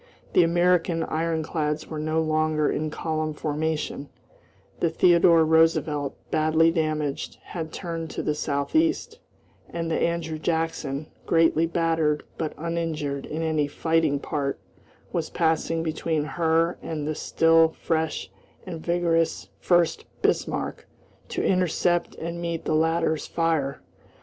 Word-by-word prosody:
The -, -, +6 dB
American 175 Hz, 0 st, +2 dB
ironclads 155 Hz, -1 st, -1 dB
were 155 Hz, -, -5 dB
no 155 Hz, +1 st, 0 dB
longer 155 Hz, -1 st, +1 dB
in 155 Hz, +1 st, -1 dB
column 155 Hz, 0 st, -2 dB
formation; 150 Hz, -1 st, -2 dB, 0.7 s
the 170 Hz, -, +2 dB
Theodore 170 Hz, 0 st, +5 dB
Roosevelt, 160 Hz, -3 st, +2 dB, 0.2 s
badly 160 Hz, +1 st, +3 dB
damaged, 155 Hz, -3 st, -2 dB
had 160 Hz, -3 st, -6 dB
turned 165 Hz, -2 st, -5 dB
to -, -, -4 dB
the 150 Hz, -, +1 dB
southeast, 315 Hz, -, 0 dB, 0.5 s
and 165 Hz, -1 st, -3 dB
the -, -, 0 dB
Andrew 165 Hz, -2 st, -1 dB
Jackson, 160 Hz, -3 st, -2 dB, 0.2 s
greatly 165 Hz, 0 st, +3 dB
battered 165 Hz, -3 st, +1 dB, 0.2 s
but 160 Hz, -2 st, -2 dB
uninjured 155 Hz, -4 st, -3 dB
in 160 Hz, +2 st, -3 dB
any 155 Hz, -2 st, +1 dB
fighting 160 Hz, 0 st, +1 dB
part 140 Hz, -1 st, -2 dB, 0.5 s
was 165 Hz, -2 st, -2 dB
passing 165 Hz, 0 st, 0 dB
between 160 Hz, -1 st, -1 dB
her 165 Hz, +2 st, +1 dB
and 150 Hz, -2 st, -4 dB
the 155 Hz, -, 0 dB
still 165 Hz, +1 st, +3 dB
fresh 160 Hz, -1 st, -1 dB, 0.3 s
and 170 Hz, -4 st, -7 dB
vigorous 170 Hz, -1 st, +1 dB
Furst 175 Hz, -2 st, +2 dB, 0.2 s
Bismarck -, -, -1 dB, 0.4 s
to -, -, -2 dB
intercept 175 Hz, -1 st, +1 dB
and 170 Hz, +1 st, -5 dB
meet 170 Hz, -1 st, -3 dB
the -, -, 0 dB
latter's 160 Hz, 0 st, +1 dB
fire. 160 Hz, -5 st, -1 dB
160 Hz, 125 wpm, -25 LUFS, 155-165 Hz, 0.7 s, The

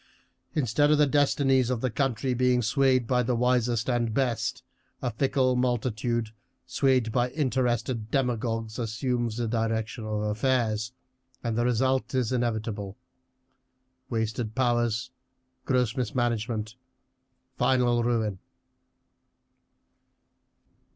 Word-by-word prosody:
Instead 145 Hz, 0 st, +2 dB
of 150 Hz, -, +5 dB
the 150 Hz, -, +5 dB
destinies 135 Hz, -3 st, +2 dB
of 125 Hz, -2 st, 0 dB
the 130 Hz, +1 st, -1 dB
country 130 Hz, 0 st, 0 dB
being 125 Hz, 0 st, +2 dB
swayed 130 Hz, +1 st, +2 dB
by 125 Hz, +1 st, +2 dB
the 125 Hz, 0 st, 0 dB
wisest 120 Hz, -2 st, +1 dB
and 120 Hz, -3 st, 0 dB
best, 120 Hz, -5 st, -1 dB, 0.4 s
a 125 Hz, -, -2 dB
fickle 130 Hz, +1 st, +1 dB
multitude, 120 Hz, -2 st, 0 dB, 0.4 s
swayed 130 Hz, -4 st, +1 dB
by 125 Hz, +2 st, +1 dB
interested 125 Hz, -5 st, -1 dB
demagogues, 115 Hz, -3 st, -1 dB
assumes 120 Hz, 0 st, -2 dB
the 120 Hz, -1 st, -1 dB
direction 115 Hz, 0 st, -2 dB
of 105 Hz, -1 st, -2 dB
affairs, 110 Hz, 0 st, 0 dB, 0.5 s
and 115 Hz, -2 st, -1 dB
the 120 Hz, -, +1 dB
result 130 Hz, +2 st, +1 dB
is 125 Hz, -3 st, +1 dB
inevitable 110 Hz, -5 st, -2 dB, 1.1 s
wasted 110 Hz, -1 st, -2 dB
powers, 120 Hz, -2 st, +1 dB, 0.5 s
gross 125 Hz, -4 st, +1 dB
mismanagement, 115 Hz, -3 st, -2 dB, 0.8 s
final 120 Hz, -2 st, +2 dB
ruin." 110 Hz, -5 st, 0 dB
120 Hz, 105 wpm, -27 LUFS, 110-130 Hz, 1.1 s, of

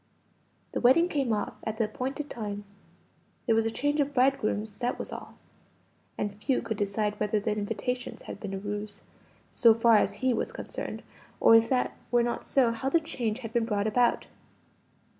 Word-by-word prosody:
The -, -, -2 dB
wedding 265 Hz, +8 st, +5 dB
came 275 Hz, -7 st, 0 dB
off 210 Hz, -1 st, -1 dB
at 220 Hz, 0 st, -3 dB
the 225 Hz, -, +2 dB
appointed 260 Hz, +7 st, -3 dB
time. 205 Hz, -5 st, -5 dB, 0.8 s
There 230 Hz, -, +3 dB
was 225 Hz, 0 st, +2 dB
a -, -, +1 dB
change 290 Hz, +6 st, 0 dB
of 285 Hz, 0 st, -2 dB
bridegrooms, 220 Hz, -5 st, +1 dB
that 245 Hz, 0 st, -1 dB
was -, -, -6 dB
all; -, -, -8 dB, 0.8 s
and 205 Hz, -1 st, -2 dB
few 250 Hz, +5 st, 0 dB
could 225 Hz, -2 st, -3 dB
decide 205 Hz, +1 st, -1 dB
whether 210 Hz, 0 st, +1 dB
the 210 Hz, +1 st, -1 dB
invitations 225 Hz, +4 st, -3 dB
had -, -, -8 dB
been 200 Hz, -3 st, -5 dB
a -, -, -3 dB
ruse, 205 Hz, +1 st, -5 dB, 0.5 s
so 230 Hz, -2 st, +5 dB
far 230 Hz, -1 st, +5 dB
as -, -, +1 dB
he 260 Hz, 0 st, +1 dB
was 225 Hz, -, -2 dB
concerned -, -, -6 dB, 0.4 s
or -, -, +6 dB
if 225 Hz, 0 st, +5 dB
that 255 Hz, -2 st, +1 dB
were 240 Hz, 0 st, +3 dB
not 240 Hz, -, -3 dB
so, 255 Hz, -4 st, +3 dB
how 230 Hz, +4 st, -2 dB
the 335 Hz, -, +4 dB
change 245 Hz, -7 st, -3 dB
had 225 Hz, -2 st, -7 dB
been 235 Hz, -2 st, +2 dB
brought 205 Hz, -2 st, 0 dB
about. 240 Hz, +3 st, +2 dB
225 Hz, 185 wpm, -28 LUFS, 210-250 Hz, 0.8 s, or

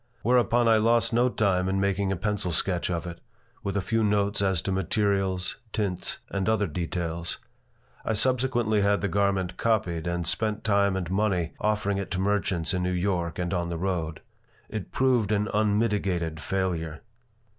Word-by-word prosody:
Whereupon 120 Hz, -1 st, +3 dB
I 115 Hz, -1 st, +6 dB
lost 115 Hz, +1 st, +3 dB
no 120 Hz, +2 st, +4 dB
time 95 Hz, -5 st, +1 dB
in 95 Hz, +1 st, +1 dB
making 100 Hz, 0 st, +1 dB
a -, -, +1 dB
pencil 100 Hz, 0 st, -2 dB
sketch 90 Hz, +2 st, 0 dB
of 85 Hz, 0 st, -2 dB
it, 85 Hz, -1 st, -7 dB, 0.4 s
with 100 Hz, -3 st, -2 dB
a 100 Hz, -, 0 dB
few 115 Hz, -1 st, +1 dB
notes 100 Hz, -1 st, +1 dB
as 95 Hz, -3 st, +2 dB
to 95 Hz, -, -1 dB
materials, 95 Hz, 0 st, 0 dB, 0.2 s
tints, 95 Hz, -4 st, -2 dB
and 100 Hz, +1 st, 0 dB
other 110 Hz, -2 st, +2 dB
details. 85 Hz, 0 st, -3 dB, 0.7 s
I 110 Hz, -, 0 dB
subsequently 120 Hz, -2 st, +1 dB
had 100 Hz, 0 st, +2 dB
the 100 Hz, -, +1 dB
garment 100 Hz, -2 st, 0 dB
copied 90 Hz, -7 st, 0 dB
and 85 Hz, 0 st, -1 dB
spent 105 Hz, +5 st, 0 dB
time 100 Hz, -2 st, +2 dB
and 90 Hz, -2 st, -3 dB
money 95 Hz, -5 st, 0 dB
offering 105 Hz, -2 st, 0 dB
it 100 Hz, -, -4 dB
to 90 Hz, -, -1 dB
merchants 95 Hz, -3 st, 0 dB
in 90 Hz, -, 0 dB
New 90 Hz, -, 0 dB
York 90 Hz, -3 st, -1 dB
and 90 Hz, 0 st, -2 dB
on 85 Hz, -2 st, -1 dB
the 85 Hz, -, -3 dB
road. 80 Hz, -3 st, -2 dB, 0.5 s
It 110 Hz, -4 st, -5 dB
proved 125 Hz, -6 st, +2 dB
an 105 Hz, 0 st, +1 dB
unmitigated 100 Hz, -6 st, +1 dB
failure. 85 Hz, -4 st, -2 dB
100 Hz, 170 wpm, -27 LUFS, 90-105 Hz, 0.7 s, I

